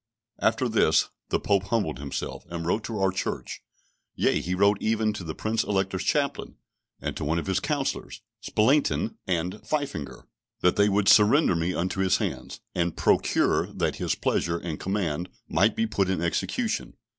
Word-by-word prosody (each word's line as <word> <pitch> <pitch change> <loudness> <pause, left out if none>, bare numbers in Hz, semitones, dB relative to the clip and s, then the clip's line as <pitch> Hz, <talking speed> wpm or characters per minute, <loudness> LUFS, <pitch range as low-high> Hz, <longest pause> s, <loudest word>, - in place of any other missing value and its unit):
After - - +2
this - - +3 0.2
the - - +1
Pope 100 -2 +1
humbled 105 - -1
himself, 70 -1 -5
and 85 -1 -5
wrote 105 +6 0
to 115 - -4
our 95 -1 +2
church, 95 - -4 0.5
yea, - - +2
he 90 +1 -2
wrote 100 +2 +3
even 110 -1 +1
to 105 - -6
the 80 -2 -5
Prince 110 +1 0
Elector's 95 -2 -1
chaplain, - - 0 0.4
and - - -4
to - - -4
one 80 +3 0
of 85 - -2
his 95 0 +1
counsellors, 145 0 -3 0.2
Spalatine 125 0 +1
and 90 +3 -1
Pfeffinger, 75 - -3 0.4
that 90 - +3
they 100 0 +4
would 100 0 +1
surrender 110 - +6
me 85 +2 -1
into 90 +2 -2
his 95 -1 +3
hands, - - -4
and 85 -1 -1
procure - - +2
that - - -2
his - - -1
pleasure 85 0 0
and 85 -3 -5
command 90 -3 -2 0.2
might 105 +2 +2
be 115 - +1
put 100 -4 0
in 95 - 0
execution. 85 0 -2
95 Hz, 170 wpm, -26 LUFS, 85-105 Hz, 0.5 s, surrender